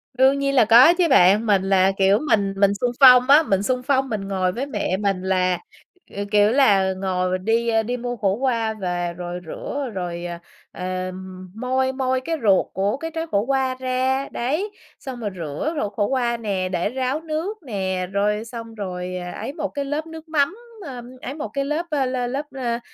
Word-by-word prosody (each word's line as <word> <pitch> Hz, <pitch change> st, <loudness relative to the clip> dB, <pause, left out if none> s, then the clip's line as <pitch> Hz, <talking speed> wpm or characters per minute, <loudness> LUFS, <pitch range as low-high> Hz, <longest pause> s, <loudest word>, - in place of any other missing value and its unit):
Đương 265 Hz, +2 st, +4 dB
nhiên 275 Hz, 0 st, 0 dB
là 245 Hz, -4 st, +6 dB
có 240 Hz, +9 st, +8 dB
chứ 355 Hz, -2 st, +3 dB
bạn, 210 Hz, -3 st, +5 dB
mình 200 Hz, -3 st, +3 dB
là, 190 Hz, 0 st, +4 dB
kiểu, 195 Hz, +2 st, +4 dB
mình 200 Hz, -2 st, +2 dB
mình 200 Hz, 0 st, +4 dB
xung 240 Hz, +4 st, -1 dB
phong 255 Hz, -1 st, +8 dB
á, 295 Hz, +3 st, +8 dB
mình 195 Hz, -8 st, 0 dB
xung 250 Hz, +3 st, -1 dB
phong 270 Hz, 0 st, +1 dB
mình 205 Hz, -3 st, -3 dB
ngồi 185 Hz, -2 st, 0 dB
với 245 Hz, +8 st, -3 dB
mẹ 260 Hz, -9 st, -2 dB
mình 195 Hz, -2 st, -1 dB
là, 185 Hz, -1 st, +1 dB, 0.6 s
ờ, 200 Hz, -, -2 dB
kiểu 210 Hz, 0 st, +4 dB
là, 200 Hz, -8 st, +4 dB
ngồi 185 Hz, -1 st, -1 dB
đi, 225 Hz, +4 st, 0 dB
a, 225 Hz, -1 st, +2 dB
đi 245 Hz, +3 st, -3 dB
mua 245 Hz, 0 st, -4 dB
khổ 200 Hz, -4 st, 0 dB
qua 230 Hz, -3 st, 0 dB
và 175 Hz, -4 st, -3 dB
rồi 175 Hz, 0 st, -6 dB
rửa 275 Hz, -, -5 dB
rồi, 175 Hz, -2 st, -4 dB
ờ, 175 Hz, -1 st, -5 dB, 0.3 s
ờm, 185 Hz, 0 st, -6 dB
moi 260 Hz, +3 st, 0 dB
moi 260 Hz, -1 st, 0 dB
cái 325 Hz, +5 st, -2 dB
ruột 195 Hz, -3 st, +4 dB
của 200 Hz, +5 st, 0 dB
cái 325 Hz, +3 st, -5 dB
trái 325 Hz, 0 st, -3 dB
khổ 200 Hz, -, +2 dB
qua 265 Hz, -1 st, 0 dB
ra. 260 Hz, +1 st, 0 dB
Đấy, 310 Hz, -, -2 dB, 0.3 s
xong 260 Hz, -2 st, -7 dB
rồi 215 Hz, -3 st, -3 dB
rửa 165 Hz, -, -3 dB
ruột 205 Hz, 0 st, -3 dB
khổ 205 Hz, +1 st, 0 dB
qua 240 Hz, -3 st, 0 dB
nè, 195 Hz, -5 st, -2 dB
để 180 Hz, +1 st, -1 dB
ráo 260 Hz, +4 st, -2 dB
nước 325 Hz, +6 st, -3 dB
nè, 190 Hz, -6 st, -2 dB
rồi 210 Hz, +2 st, 0 dB
xong 230 Hz, -1 st, -8 dB
rồi, 185 Hz, -3 st, -5 dB
à, 180 Hz, 0 st, -6 dB
ấy 275 Hz, -, -6 dB
một 310 Hz, -1 st, -3 dB
cái 285 Hz, -1 st, -4 dB
lớp 295 Hz, +3 st, -3 dB
nước 320 Hz, 0 st, -10 dB
mắm, 305 Hz, +3 st, +1 dB, 0.3 s
a, 255 Hz, -4 st, -7 dB, 0.2 s
ấy 265 Hz, -, -5 dB
một 300 Hz, +1 st, -5 dB
cái 275 Hz, 0 st, -1 dB
lớp, 305 Hz, +4 st, -2 dB
a, 285 Hz, -3 st, +1 dB
la 255 Hz, -1 st, -2 dB
lớp, 275 Hz, +4 st, -3 dB
a, 245 Hz, -3 st, -2 dB
230 Hz, 210 wpm, -22 LUFS, 190-265 Hz, 0.6 s, có